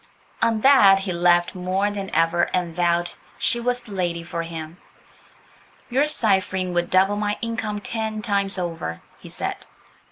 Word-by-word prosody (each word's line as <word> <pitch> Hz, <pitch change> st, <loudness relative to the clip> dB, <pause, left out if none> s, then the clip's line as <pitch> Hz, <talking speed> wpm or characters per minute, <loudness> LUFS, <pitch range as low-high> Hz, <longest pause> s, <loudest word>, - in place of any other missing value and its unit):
On 225 Hz, -1 st, +2 dB
that 215 Hz, -8 st, +7 dB
he 195 Hz, -1 st, -3 dB
laughed 175 Hz, 0 st, +3 dB
more 185 Hz, +3 st, -1 dB
than 200 Hz, -1 st, -5 dB
ever 165 Hz, +1 st, +2 dB
and 175 Hz, -3 st, -2 dB
vowed 175 Hz, 0 st, +1 dB, 0.3 s
she 240 Hz, -, +1 dB
was 245 Hz, +1 st, -1 dB
the 215 Hz, -, -13 dB
lady 175 Hz, -3 st, -2 dB
for 170 Hz, 0 st, -4 dB
him. 165 Hz, 0 st, -7 dB, 1.1 s
"Your 275 Hz, +4 st, +2 dB
ciphering 190 Hz, -8 st, +1 dB
would 175 Hz, 0 st, 0 dB
double 195 Hz, +2 st, +3 dB
my 210 Hz, 0 st, -1 dB
income 225 Hz, -2 st, -3 dB
ten 220 Hz, -1 st, -4 dB
times 200 Hz, -2 st, 0 dB
over," 165 Hz, -, -4 dB, 0.2 s
he -, -, -12 dB
said. -, -, -5 dB
190 Hz, 155 wpm, -23 LUFS, 175-215 Hz, 1.1 s, that